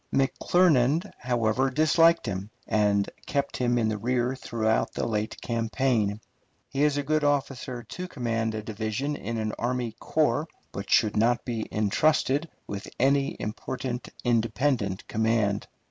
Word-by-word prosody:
McClernand, 155 +3 +3
however, 120 +1 +1
disliked 165 +4 +4
him, 95 -1 -4 0.2
and 105 -2 +2 0.2
kept 140 -1 -1
him 120 -1 +1
in 115 -2 +2
the 110 -1 -1
rear 125 +3 0
throughout 110 -3 0
the - - -2
late 110 -1 -2
campaign. 115 -2 0 0.5
He 140 - 0
is 150 -1 +3
a 145 - 0
good 155 +2 +1
officer 135 -4 -1
to 180 - -6
command 115 -6 -2
a 110 - -4
division 110 +6 -2
in 115 -2 -4
an 110 -1 -1
army 120 -1 -1
corps, - - +1 0.2
but - - -6
should 105 -1 +4
not 120 +3 +2
be 115 -3 -3
intrusted 140 +8 +2 0.2
with 100 -1 -6
any 140 +2 +2
important 125 +3 -4
independent 115 -3 0
command. 110 -2 +1
120 Hz, 140 wpm, -27 LUFS, 110-135 Hz, 0.5 s, disliked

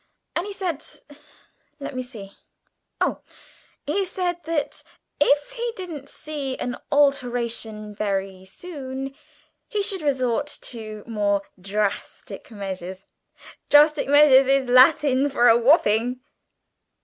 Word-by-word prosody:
And 350 +4 -1
he - - -5
said, 355 -6 -3 1.0
let 280 - -6
me 255 - -2
see, 225 -6 -9 0.7
oh, - - 0 0.6
he 360 +8 0
said 355 -2 -2
that 320 -3 -2 0.4
'if 290 +5 +3
he 475 -1 -3
didn't 330 -7 -7
see 290 -4 -5
an 245 - -3 0.2
alteration 240 -6 0
very 195 -2 -3
soon 270 - -7 0.5
he 420 -4 -1
should 390 -2 -1
resort 270 -2 0
to 215 -3 -7
more 205 -3 0 0.2
drastic 200 +1 -3
measures' 190 -3 -7 0.6
drastic 295 0 +5
measures 280 -2 +6
is 270 -1 +2
Latin 270 +2 +5
for 245 -3 +3
a 230 - +7
whopping." 240 -2 +3
265 Hz, 115 wpm, -23 LUFS, 220-300 Hz, 1.0 s, a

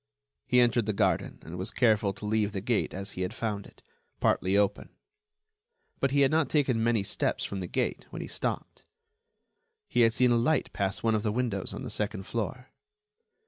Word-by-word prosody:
He 125 - +4
entered 120 -2 +3
the 110 - +1
garden, - - +1
and 85 +2 -7
was 95 +4 -3
careful 110 -4 +3
to 105 - -9
leave 105 -1 +1
the 100 - -2
gate 110 +3 0
as 100 +1 -5
he 90 - -6
had 90 - -2
found 105 -3 -3
it—partly 95 +2 -2
open. 100 -1 +1 1.1
But 135 - +2
he 140 +1 +2
had 135 - +4
not 160 -1 +2
taken 130 -7 +2
many 115 -3 +2
steps - - -1
from 100 - -4
the 90 - -4
gate - - -2
when - - -6
he - - -7
stopped. - - -4 1.1
He - - +2
had 115 -1 +4
seen 125 -1 +4
a 120 - +4
light 130 +5 +1
pass 100 -1 -2
one 115 -1 +3
of 110 - +1
the 105 -1 0
windows 110 -5 -2
on - - -6
the - - -5
second 105 -2 -2
floor. 120 +5 -4
110 Hz, 195 wpm, -29 LUFS, 100-120 Hz, 1.1 s, He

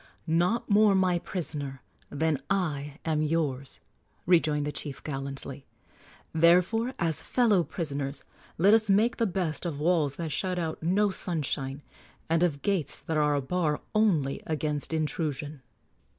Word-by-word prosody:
"Not 175 +8 +1
more 205 -1 +5
my 185 -2 +2
prisoner 145 -8 -5 0.3
than 150 -1 0
I 150 -7 -1
am 155 -2 +1
yours," 150 -4 -1 0.5
rejoined 155 -4 +3
the 150 - -2
chief, 145 -2 -6
gallantly. 135 -1 -6 0.7
"Therefore, 180 +10 +3
as 165 -3 -1
fellow 220 -8 +3
prisoners, 145 -5 -4 0.3
let 195 +6 +5
us 220 -2 +3
make 215 +5 +3
the 230 - +2
best 175 -5 -2
of 165 -5 -3
walls 155 -3 +2
that 165 -2 -4
shut 185 +5 -1
out 160 -2 -3
no 195 +5 +2
sunshine, 145 -6 -3 0.5
and 165 0 +3
of 155 -6 +1
gates 195 -7 0
that 160 - -3
are 150 -1 +3
a 140 - +1
bar 155 0 0
only 175 -11 +2
against 150 -2 -2
intrusion." 150 -2 -2
160 Hz, 140 wpm, -28 LUFS, 145-185 Hz, 0.7 s, more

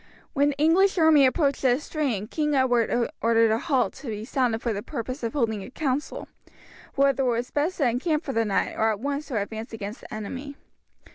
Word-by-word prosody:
When 285 +1 +3
the 285 - -4
English 355 +6 +3
army 315 -5 +6
approached 280 0 0
the 255 -1 +3
stream 280 -10 -2
King 300 +5 -1
Edward 245 -2 +2
ordered 230 -1 +4
a 220 - +1
halt 255 - 0
to 270 0 -10
be 215 -1 -4
sounded 245 -3 0
for 235 - 0
the 200 - -4
purpose 255 +6 -5
of 230 -2 -3
holding 225 -7 0
a - - -9
council, 280 +2 -3 0.7
whether 275 0 +3
it 260 - +1
was 240 +1 -2
best 310 +6 -1
to 280 - +2
encamp 300 +7 0
for 270 - -4
the 225 - +2
night 205 -3 0
or 220 - +2
at 215 -2 -1
once 285 +3 -3
to 245 -7 -1
advance 220 +3 -6
against 210 +1 -6
the - - -13
enemy. 255 +6 -6
255 Hz, 210 wpm, -25 LUFS, 225-290 Hz, 0.7 s, army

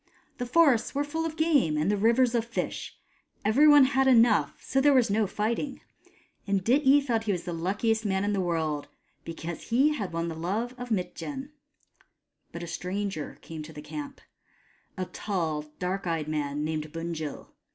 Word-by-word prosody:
The 245 - -2
forests 275 -4 +3
were 285 - +1
full 320 +3 -2
of 315 0 -8
game, 290 - +3
and 155 +6 +1
the - - +2
rivers 235 +4 +3
of 235 -2 +2
fish: 235 - -4 0.5
every 260 +9 +5
one 290 -2 +8
had 265 0 +3
enough, 235 -4 +4
so 270 - 0
there 285 0 +5
was 240 -5 +3
no 210 0 +2
fighting. 230 +8 -2 0.7
And 195 -2 +1
Dityi 275 +3 +4
thought 225 -4 0
he 210 - +1
was 180 -3 -2
the 175 - -4
luckiest 210 +6 0
man 190 -2 0
in 205 0 0
the 195 - 0
world, 160 -4 -1 0.4
because 165 0 -7
he 265 +6 +4
had 200 -11 -4
won 165 0 -2
the 165 - -3
love 200 +10 -2
of 245 -1 -7
Mitjen. 265 +7 -3 1.0
But 170 - -7
a - - -6
stranger 185 -1 -4
came 160 -1 -8
to 155 +1 -10
the 150 - -9
camp: 285 - -7 0.8
a 185 - -2
tall 165 -7 -3
dark 185 +1 -3
eyed 165 -3 -1
man 150 -1 -2
named 155 -1 -3
Bunjil. 165 -2 -5
205 Hz, 180 wpm, -28 LUFS, 165-260 Hz, 1.0 s, one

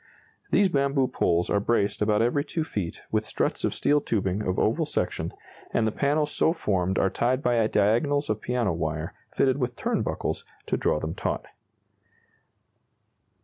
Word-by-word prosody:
These 200 -2 +4
bamboo 140 -3 +2
poles 85 -8 +1
are 105 - +3
braced 105 -1 0
about 105 +1 +3
every 135 +5 +1
2 160 +2 -2
feet 100 - -4
with - - +1
struts - - -2
of - - 0
steel 145 0 +3
tubing 100 -5 -1
of 95 -3 -1
oval - - +1
section, - - -1 0.4
and 115 - +3
the 110 - +1
panels 145 +4 +1
so 160 - +2
formed 95 - 0
are 95 - +2
tied 130 +3 0
by 120 -3 +3
diagonals 140 +9 +2
of 110 0 -1
piano 120 -7 0
wire 80 0 -3 0.2
fitted 135 +1 +1
with 125 -2 -1
turn - - -1
buckles - - -2 0.2
to - - 0
draw 75 - +1
them 80 +1 -3
taut. - - -3
115 Hz, 165 wpm, -26 LUFS, 95-140 Hz, 0.4 s, These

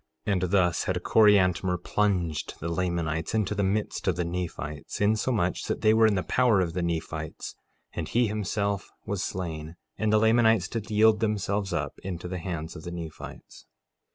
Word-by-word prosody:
1:32 100 - +1
And 90 - 0
thus 90 -2 +2
had - - -1
Coriantumr 95 -4 +4
plunged 90 -4 -1
the 85 - -3
Lamanites 85 -1 -1
into 105 -2 +1
the 100 - -1
midst 100 +2 -1
of - - +2
the 90 - -1
Nephites, 85 -4 -5
insomuch 105 -2 +1
that - - -2
they 110 - +5
were 110 0 +5
in 105 - +2
the 90 - 0
power 120 +2 +3
of 85 -3 0
the 90 - -2
Nephites, 80 -2 -4 0.4
and - - -4
he 120 +1 +3
himself 100 -1 -2 0.2
was 100 -1 -2
slain, 80 -4 -5 0.2
and 110 -1 +1
the 110 - +5
Lamanites 110 -2 +4
did 115 -3 -5
yield 110 0 +4
themselves 105 -2 -1 0.3
into 90 -2 -5
the 90 0 -4
hands 85 -3 -5
of - - -8
the 85 +2 -7
Nephites. 85 -3 -9
95 Hz, 175 wpm, -27 LUFS, 85-105 Hz, 0.4 s, they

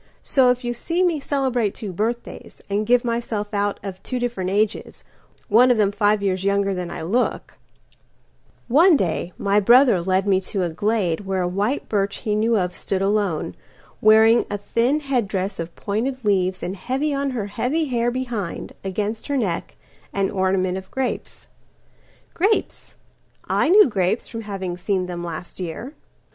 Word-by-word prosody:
So 260 -2 +3
if 250 +1 +1
you 240 0 -1
see 335 +9 -1
me 340 -4 +1
celebrate 260 -7 0
two 205 -4 -6
birthdays, 230 +6 -4
And 210 +1 0
give 245 0 +3
myself 230 -3 -2
out 205 0 0
of 190 -2 -7
two 255 - -4
different 240 -7 -2
ages, 210 +3 -1 0.4
One 240 +4 +5
of 245 - +4
them 205 -2 +3
five 205 0 +1
years 190 -1 0
younger 200 0 +1
than 180 -2 -4
I - - -6
look—One 255 - -1
day 175 -3 -1
my 200 +1 +2
brother 235 -2 +5
led 190 +2 +1
me 190 -1 +3
to 190 0 -3
a 175 - -1
gladeWhere 195 0 -1
a - - 0
white 205 +9 -1
birch 200 -2 0
he 210 - +1
knew 220 +2 +2
of 180 -2 -1
stood 195 0 -2
alone, 195 - 0 0.5
Wearing 220 +2 +6
a 205 - -2
thin 235 +8 0
head 260 -7 0
dress 195 0 -3
of 165 0 -5
pointed 235 +5 -3
leaves, 185 -2 +1
And 185 - -3
heavy 265 +9 -2
on 280 0 -1
her 240 -6 -3
heavy 250 +10 -1
hair 240 -3 0
behind, 240 -7 -4
Against 205 +3 -3
her 285 - 0
neck, 190 -9 -2 0.4
an 195 -1 0
ornament 190 -1 0
of 190 - -14
grapes. 265 -1 -4 0.9
Grapes, 405 +5 -1 0.5
I - - +1
knew 410 +1 +7
grapes 195 -1 0
from 230 - -6
having 190 -4 -5
seen 185 0 -1
them 175 -1 -5
last 170 +2 -7
year. 185 - -5
210 Hz, 165 wpm, -22 LUFS, 190-245 Hz, 0.9 s, knew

